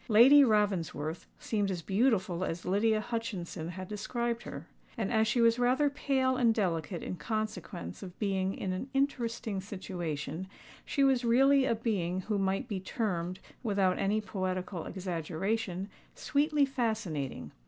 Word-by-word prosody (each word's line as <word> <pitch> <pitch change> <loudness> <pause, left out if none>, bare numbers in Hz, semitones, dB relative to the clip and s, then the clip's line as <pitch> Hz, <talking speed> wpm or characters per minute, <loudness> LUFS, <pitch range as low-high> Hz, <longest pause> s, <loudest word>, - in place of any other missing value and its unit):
Lady 260 +6 +8
Ravensworth 185 - 0
seemed 205 -3 -1
as 175 -3 -3
beautiful 195 -4 +1
as 165 -2 -3
Lydia 215 +4 +2
Hutchinson 210 -8 -4
had 185 +1 -6
described 235 +3 -2
her; - - -7 0.3
and, 220 0 -1
as 220 0 +3
she 235 +3 +2
was 230 +1 +4
rather 260 +4 +3
pale 265 -2 +1
and 235 -3 +4
delicate 175 -4 -1
in - - -4
consequence 215 - -4
of 185 -2 -9
being 195 -2 0
in 185 - -2
an 190 +9 -4
"interesting 235 -7 -1
situation," 185 -3 -4 0.4
she 280 - +1
was 265 -2 +4
really 265 +3 +5
a 230 - +2
being 190 -6 -1
who 205 +1 -1
might 195 +5 0
be 205 -5 -3
termed, 185 -3 -2 0.2
without 195 -5 +1
any 205 +2 +2
poetical 185 -3 -3
exaggeration, 185 +2 -2 0.3
sweetly 290 0 +2
fascinating. 220 - -2
205 Hz, 145 wpm, -31 LUFS, 185-235 Hz, 0.4 s, Lady